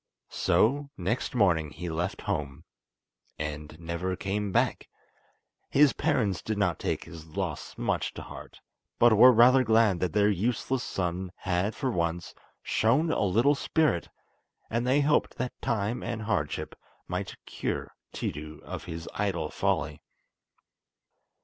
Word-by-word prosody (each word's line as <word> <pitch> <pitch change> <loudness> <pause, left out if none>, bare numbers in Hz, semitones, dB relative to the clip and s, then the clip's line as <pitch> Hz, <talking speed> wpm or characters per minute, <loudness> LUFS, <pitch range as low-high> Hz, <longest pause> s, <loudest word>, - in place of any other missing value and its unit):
So 140 +5 +2
next 100 +8 -2
morning 85 -9 +3
he 85 +4 -7
left 85 +3 -2
home—and 75 +2 -7
never 85 +2 -3
came 100 +1 -2
back! - - +1 0.8
His 145 0 +5
parents 115 - 0
did 110 -1 -3
not 100 - +1
take - - -2
his 80 -1 -11
loss 75 - -4
much - - -1
to - - -6
heart, - - -11 0.4
but 120 -1 +6
were 125 +4 +9
rather 125 +3 +6
glad 110 -5 +4
that 90 -2 -1
their 105 -1 +4
useless 120 +6 -1
son 90 -2 -3
had 95 +4 -1
for 135 -3 -1
once 85 -3 -2 0.3
shown 140 +9 +2
a - - 0
little 110 +8 +4
spirit, 150 - +1 0.6
and 120 +2 0
they 135 +3 +4
hoped 150 +1 +2
that 125 -1 -2
time 110 +2 -1
and 110 -1 -4
hardship 100 -10 -2 0.3
might - - -4
cure - - -4 0.2
Tiidu 75 +1 -5
of - - -7
his 80 0 -6
idle 90 -7 -1
folly. - - -1
100 Hz, 135 wpm, -28 LUFS, 85-120 Hz, 0.8 s, were